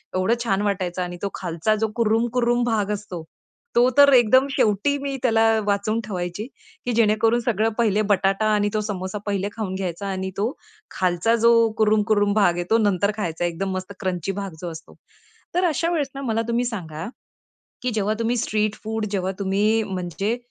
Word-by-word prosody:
एवढं 185 Hz, +5 st, +2 dB
छान 195 Hz, -4 st, 0 dB
वाटायचं 185 Hz, -3 st, -1 dB
आणि 175 Hz, 0 st, -4 dB
तो 200 Hz, -, -1 dB
खालचा 175 Hz, +4 st, -1 dB
जो 220 Hz, +1 st, 0 dB
कुरुमकुरुम 240 Hz, +2 st, +1 dB
भाग 215 Hz, -4 st, 0 dB
असतो 200 Hz, -5 st, -5 dB, 0.5 s
तो 245 Hz, +1 st, +5 dB
तर 285 Hz, 0 st, +8 dB
एकदम 260 Hz, +2 st, +5 dB
शेवटी 220 Hz, +4 st, +1 dB
मी 275 Hz, -1 st, -3 dB
त्याला 225 Hz, -3 st, +3 dB, 0.2 s
वाचून 205 Hz, +2 st, 0 dB
ठेवायची, 180 Hz, 0 st, -4 dB, 0.4 s
की 245 Hz, -, 0 dB
जेणेकरून 225 Hz, +1 st, +3 dB
सगळं 225 Hz, -2 st, +1 dB
पहिले 215 Hz, -3 st, +2 dB
बटाटा 195 Hz, +2 st, +2 dB
आणि 205 Hz, 0 st, +2 dB
तो 215 Hz, -, +1 dB
समोसा 195 Hz, -2 st, -4 dB
पहिले 200 Hz, -1 st, -1 dB
खाऊन 205 Hz, -5 st, -3 dB
घ्यायचा 190 Hz, +1 st, -4 dB
आणि 190 Hz, -1 st, -3 dB
तो 215 Hz, +5 st, 0 dB, 0.4 s
खालचा 185 Hz, +5 st, +1 dB
जो 235 Hz, 0 st, +6 dB, 0.3 s
कुरुम, 215 Hz, -1 st, +3 dB
कुरुम 205 Hz, -1 st, +3 dB
भाग 200 Hz, -4 st, +4 dB
आहे, 175 Hz, -, -2 dB
तो 225 Hz, -, +5 dB
नंतर 205 Hz, -2 st, +2 dB
खायचा 175 Hz, -4 st, -2 dB
एकदम 175 Hz, +3 st, -2 dB
मस्त 185 Hz, +2 st, -5 dB
क्रंची 185 Hz, -1 st, -2 dB
भाग 195 Hz, -3 st, -5 dB
जो 175 Hz, -2 st, -4 dB
असतो. 160 Hz, 0 st, -11 dB, 0.6 s
तर 360 Hz, +1 st, +3 dB
अशा 330 Hz, 0 st, +1 dB
वेळेस 305 Hz, -5 st, 0 dB
ना 275 Hz, -, -5 dB
मला 225 Hz, -4 st, 0 dB
तुम्ही 235 Hz, +1 st, 0 dB
सांगा, 165 Hz, -9 st, -5 dB, 0.8 s
की 250 Hz, -, 0 dB
जेव्हा 215 Hz, 0 st, 0 dB
तुम्ही 230 Hz, +1 st, 0 dB
स्ट्रीट 215 Hz, -2 st, 0 dB
फूड 220 Hz, 0 st, -2 dB
जेव्हा 190 Hz, -1 st, -1 dB
तुम्ही 205 Hz, +3 st, +1 dB
म्हणजे 195 Hz, +3 st, -2 dB
210 Hz, 180 wpm, -23 LUFS, 190-230 Hz, 0.8 s, तर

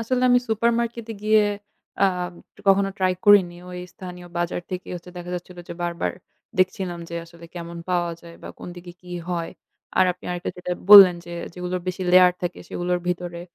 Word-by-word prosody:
আসলে 250 Hz, +2 st, 0 dB
আমি 245 Hz, -, +6 dB
supermarket 235 Hz, +1 st, 0 dB
এ -, -, -8 dB
গিয়ে 215 Hz, 0 st, +5 dB, 0.6 s
আম 180 Hz, -2 st, +1 dB, 0.3 s
কখনো 195 Hz, 0 st, +4 dB
ট্রাই 185 Hz, -1 st, +2 dB
করিনি। 200 Hz, -4 st, +6 dB
ঐ -, -, -8 dB, 0.2 s
স্থানীয় 180 Hz, -1 st, -9 dB
বাজার 175 Hz, 0 st, -1 dB
থেকেই 185 Hz, -1 st, -5 dB
হচ্ছে 175 Hz, +1 st, -11 dB
দেখা 175 Hz, 0 st, -7 dB
যাচ্ছিল 180 Hz, 0 st, -10 dB
যে, -, -, -5 dB
বারবার 170 Hz, 0 st, -1 dB, 0.5 s
দেখছিলাম 185 Hz, -1 st, 0 dB
যে 170 Hz, -, -7 dB
আসলে 170 Hz, 0 st, -15 dB
কেমন 170 Hz, -1 st, -7 dB
পাওয়া 175 Hz, -1 st, +1 dB
যায় 170 Hz, -1 st, -13 dB
বা -, -, -8 dB
কোন -, -, -8 dB
দিকে 175 Hz, 0 st, -10 dB
কি 180 Hz, -, -14 dB, 0.2 s
হয়? 170 Hz, -2 st, -2 dB, 0.5 s
আর 185 Hz, -, +7 dB
আপনি 180 Hz, -, -21 dB
আরেকটা 175 Hz, 0 st, -3 dB
যেটা 180 Hz, 0 st, -3 dB, 0.2 s
বললেন 195 Hz, -3 st, +12 dB
যে, 175 Hz, -, -9 dB, 0.2 s
যেগুলোর 180 Hz, 0 st, -3 dB
বেশি 185 Hz, +1 st, -3 dB
লেয়ার 180 Hz, 0 st, +7 dB
থাকে, 175 Hz, 0 st, -3 dB
সেগুলোর 180 Hz, 0 st, -1 dB
ভিতরে 175 Hz, -1 st, -3 dB
180 Hz, 180 wpm, -23 LUFS, 175-190 Hz, 0.6 s, বললেন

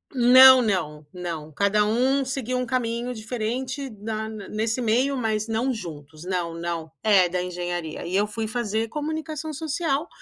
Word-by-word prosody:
Não, 260 Hz, +1 st, +9 dB
não, 160 Hz, -9 st, -1 dB
não. 170 Hz, -4 st, -6 dB
Cada 200 Hz, +6 st, +2 dB
um 255 Hz, +6 st, +2 dB
seguiu 260 Hz, -2 st, -3 dB
um 250 Hz, -, -1 dB
caminho 240 Hz, 0 st, -2 dB
diferente 250 Hz, +4 st, -4 dB
na 215 Hz, 0 st, -5 dB
n 215 Hz, -3 st, -8 dB
nesse 225 Hz, +3 st, -1 dB
meio 250 Hz, +5 st, +1 dB
mas 220 Hz, -2 st, -1 dB
não 230 Hz, +4 st, 0 dB
juntos, 155 Hz, -, -9 dB
não, 180 Hz, -2 st, -2 dB
não. 165 Hz, -1 st, -4 dB
É, 200 Hz, -4 st, +5 dB
da 180 Hz, +1 st, -2 dB
Engenharia. 175 Hz, -2 st, -4 dB
E 180 Hz, -, -3 dB
eu 205 Hz, +1 st, +3 dB
fui 220 Hz, +1 st, -4 dB
fazer 220 Hz, -1 st, -1 dB
Comunicação 310 Hz, +3 st, -4 dB
Social, 310 Hz, 0 st, -2 dB
220 Hz, 160 wpm, -24 LUFS, 180-255 Hz, -, Não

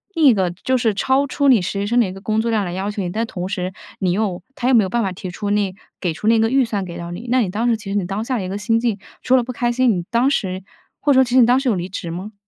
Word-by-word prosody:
另 325 Hz, -2 st, +3 dB
一 265 Hz, -, +8 dB
个， 190 Hz, -4 st, 0 dB
就 255 Hz, +9 st, -1 dB
是 230 Hz, -3 st, +1 dB
超 265 Hz, +7 st, +2 dB
出 280 Hz, +1 st, 0 dB
你 250 Hz, -7 st, +6 dB
实 190 Hz, +3 st, -3 dB
习 200 Hz, -, -1 dB
生 240 Hz, +3 st, +2 dB
的 235 Hz, -, +4 dB
一 185 Hz, -, -4 dB
个 195 Hz, -, -9 dB
工 215 Hz, +1 st, 0 dB
作 230 Hz, +1 st, -1 dB
量 215 Hz, -3 st, +1 dB
来 175 Hz, -, -4 dB
要 195 Hz, +3 st, -2 dB
求 205 Hz, -, -4 dB
你， 180 Hz, -, -2 dB
但 220 Hz, +6 st, -1 dB
同 180 Hz, -5 st, -5 dB
时 185 Hz, -1 st, -3 dB, 0.3 s
你 185 Hz, -2 st, +1 dB
又 190 Hz, -2 st, -1 dB
他 250 Hz, -, -2 dB
又 260 Hz, -, +4 dB
没 225 Hz, -, +6 dB
有 190 Hz, -, -2 dB
办 235 Hz, +4 st, 0 dB
法 195 Hz, -4 st, -1 dB
提 185 Hz, 0 st, -7 dB
出 205 Hz, +3 st, -4 dB
那 205 Hz, -2 st, +1 dB, 0.3 s
给 180 Hz, -, 0 dB
出 210 Hz, -, -5 dB
那 230 Hz, +1 st, +5 dB
个 225 Hz, 0 st, +2 dB
预 265 Hz, +2 st, +3 dB
算 210 Hz, -4 st, -2 dB
给 170 Hz, -1 st, -7 dB
到 170 Hz, 0 st, -6 dB
你。 205 Hz, +8 st, -7 dB
那 255 Hz, 0 st, +4 dB
你 215 Hz, -, 0 dB
当 220 Hz, +6 st, -1 dB
时 235 Hz, -, +3 dB
其 215 Hz, -2 st, -9 dB
实 -, -, -2 dB
你 195 Hz, -, 0 dB
当 195 Hz, +4 st, -3 dB
下 255 Hz, +2 st, -1 dB
的 205 Hz, -, -3 dB
一 185 Hz, -, -4 dB
个 195 Hz, -, -3 dB
心 225 Hz, +2 st, +1 dB
境， 230 Hz, -4 st, -1 dB, 0.2 s
除 255 Hz, -, +4 dB
了 250 Hz, -, +2 dB
不 255 Hz, -, -4 dB
开 240 Hz, 0 st, 0 dB
心， 255 Hz, +1 st, +2 dB
你 175 Hz, -, -3 dB
当 240 Hz, +3 st, +3 dB
时 190 Hz, -8 st, -1 dB, 0.4 s
或 285 Hz, -, +3 dB
者 -, -, +3 dB
说 265 Hz, -, +7 dB
其 250 Hz, -, -5 dB
实 -, -, +5 dB
你 -, -, +7 dB
当 250 Hz, +1 st, +5 dB
时 270 Hz, -1 st, 0 dB
有 220 Hz, -, +2 dB
离 180 Hz, 0 st, -3 dB
职 175 Hz, -3 st, -5 dB
吗？ 190 Hz, +6 st, -6 dB
215 Hz, 375 characters per minute, -20 LUFS, 190-240 Hz, 0.4 s, 一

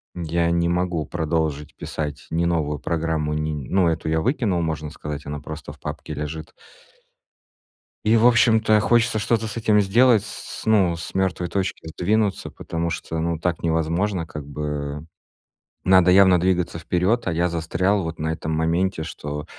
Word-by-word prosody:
М, 90 Hz, -, -5 dB
я 85 Hz, +1 st, +1 dB
не 85 Hz, 0 st, +1 dB
могу 90 Hz, -3 st, 0 dB
продолжить 80 Hz, -3 st, -2 dB
писать 75 Hz, -2 st, -5 dB
ни 85 Hz, +1 st, +1 dB
новую 75 Hz, -4 st, 0 dB
программу, 80 Hz, -2 st, -1 dB
ни 75 Hz, -3 st, -3 dB
ну, 90 Hz, -3 st, +3 dB
эту 80 Hz, -1 st, -2 dB
я 80 Hz, 0 st, +1 dB
выкинул, 105 Hz, -, 0 dB
можно 80 Hz, -2 st, -3 dB
сказать, 75 Hz, -2 st, -6 dB
она 75 Hz, 0 st, -5 dB
просто 80 Hz, -2 st, -8 dB
в -, -, -19 dB
папке 75 Hz, -, -6 dB
лежит. 75 Hz, +2 st, -6 dB, 1.5 s
И, 110 Hz, +2 st, +4 dB
в 115 Hz, +1 st, +4 dB
общем-то, 110 Hz, -3 st, +4 dB
хочется 115 Hz, 0 st, +2 dB
что-то 110 Hz, +1 st, 0 dB
с 110 Hz, -, -6 dB
этим 105 Hz, -2 st, +3 dB
сделать, 115 Hz, +2 st, +4 dB
с 110 Hz, -, -7 dB
ну, 95 Hz, -6 st, +3 dB
с 80 Hz, -, -7 dB
мёртвой 95 Hz, -2 st, 0 dB
точки 95 Hz, -3 st, -3 dB
сдвинуться, 100 Hz, +5 st, 0 dB
потому 85 Hz, 0 st, -3 dB
что, 80 Hz, 0 st, -4 dB
ну, 85 Hz, 0 st, -1 dB
так 85 Hz, -1 st, -2 dB
невозможно, 85 Hz, +3 st, 0 dB
как 75 Hz, -3 st, -8 dB
бы. 75 Hz, 0 st, -4 dB, 0.8 s
Надо 95 Hz, -1 st, +6 dB
явно 95 Hz, -1 st, +6 dB
двигаться 90 Hz, -1 st, 0 dB
вперёд, 90 Hz, +7 st, 0 dB
а 90 Hz, -, +1 dB
я 85 Hz, +2 st, +1 dB
застрял 85 Hz, +4 st, 0 dB
вот 80 Hz, -1 st, -5 dB
на 80 Hz, +1 st, -1 dB
этом 80 Hz, 0 st, -4 dB
моменте, 80 Hz, +1 st, 0 dB
что 75 Hz, -1 st, -6 dB
85 Hz, 165 wpm, -23 LUFS, 80-95 Hz, 1.5 s, Надо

